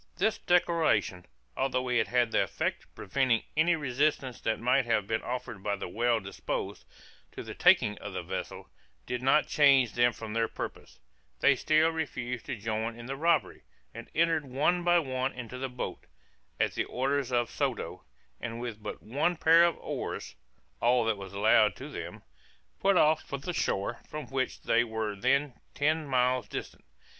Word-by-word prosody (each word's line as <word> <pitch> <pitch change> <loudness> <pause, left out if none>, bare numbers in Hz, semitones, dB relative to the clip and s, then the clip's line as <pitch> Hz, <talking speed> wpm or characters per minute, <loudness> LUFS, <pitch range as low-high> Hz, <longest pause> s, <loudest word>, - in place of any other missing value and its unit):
This 220 +4 +1
declaration, 160 - +1 0.3
although 130 -1 0
it 125 -1 +2
had 120 -2 +2
the - - +3
effect - - -2
of - - -36
preventing 120 +1 +1
any 170 +3 +4
resistance 140 -3 -1
that 110 - -1
might 125 +2 +2
have 110 -4 +1
been 110 +2 -1
offered 120 -4 -5
by 100 +1 -1
the 100 - -6
well 115 +5 +1
disposed, 95 -2 -5 0.5
to - - -7
the - - -7
taking - - +4
of - - -7
the - - -4
vessel, - - -6 0.4
did 125 0 -3
not 135 +4 +4
change 135 -6 +4
them 120 0 +4
from 110 -2 -8
their 115 0 +1
purpose; - - -8 0.4
they 140 - +5
still 155 +5 +3
refused 125 -7 -4
to - - -2
join 110 +1 -3
in 120 - -9
the 135 +2 -4
robbery, 160 +1 +1 0.3
and - - -9
entered 165 -1 +2
one 155 +7 +1
by 175 0 +4
one 130 -4 -1
into 125 0 -7
the 135 0 -3
boat, 125 0 -6 0.5
at - - +1
the - - -1
orders 135 0 -1
of 120 -2 +1
Soto, - - -3 0.4
and 115 +1 -5
with 115 -3 -6
but - - -7
one 145 +9 0
pair 165 +1 +6
of 170 -1 +2
oars - - -5 0.5
(all 120 0 +3
that 110 -1 +1
was 95 -1 -8
allowed 105 +1 +4
to - - -8
them) - - -7 0.6
put 195 -1 +3
off 155 -1 +4
for 140 - -5
the 160 +6 -5
shore, 115 - -1
from 155 -1 -5
which 130 -1 -2
they 120 +1 +3
were 110 -2 -3
then 140 +7 +1 0.2
ten 155 +2 +1
miles 125 -3 +1
distant. - - -7
125 Hz, 175 wpm, -29 LUFS, 115-150 Hz, 0.6 s, pair